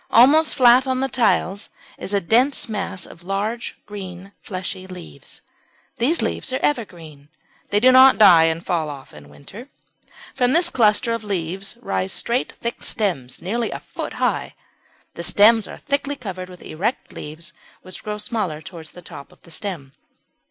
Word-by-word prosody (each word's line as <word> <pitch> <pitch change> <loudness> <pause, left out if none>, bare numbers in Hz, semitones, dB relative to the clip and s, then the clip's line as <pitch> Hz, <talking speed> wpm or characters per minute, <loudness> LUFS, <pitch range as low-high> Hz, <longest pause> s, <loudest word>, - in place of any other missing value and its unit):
Almost 290 +7 +5
flat 255 0 +6
on 260 -1 0
the 270 - 0
tiles 210 -6 0 0.3
is - - -4
a 200 - +3
dense 245 +10 +2
mass 195 -4 -4
of 170 - -14
large 205 +6 -3
green 190 -2 -9
fleshy 185 -1 -6
leaves. 180 -2 -11 0.6
These 285 +9 +1
leaves - - -2
are 260 - 0
evergreen, 165 - -3 0.4
they 205 - +2
do 255 +4 +6
not 260 +1 +8
die 175 -6 +8
and 165 +1 -1
fall 165 -4 -1
off 140 -2 -10
in 75 -1 -14
winter. 135 - -12 0.7
From 250 -1 +2
this 345 +1 +3
cluster 230 0 +3
of 230 -1 -4
leaves 195 +1 -3
rise 95 0 -2
straight 240 +2 -1
thick 235 - -5
stems 165 - -2
nearly 230 +6 -1
a - - -5
foot - - -7
high. - - -1 0.6
The - - -7
stems 215 +4 +4
are - - -9
thickly 280 0 -2
covered 185 -8 -7
with 180 -1 -13
erect 200 +11 -3
leaves 155 +1 -8 0.3
which 185 - -9
grow 210 0 -4
smaller 210 -8 -3
towards 165 -2 -11
the 180 - -12
top 140 -3 -11
of - - -22
the 170 - -17
stem. 165 -7 -6
200 Hz, 165 wpm, -21 LUFS, 170-235 Hz, 0.7 s, not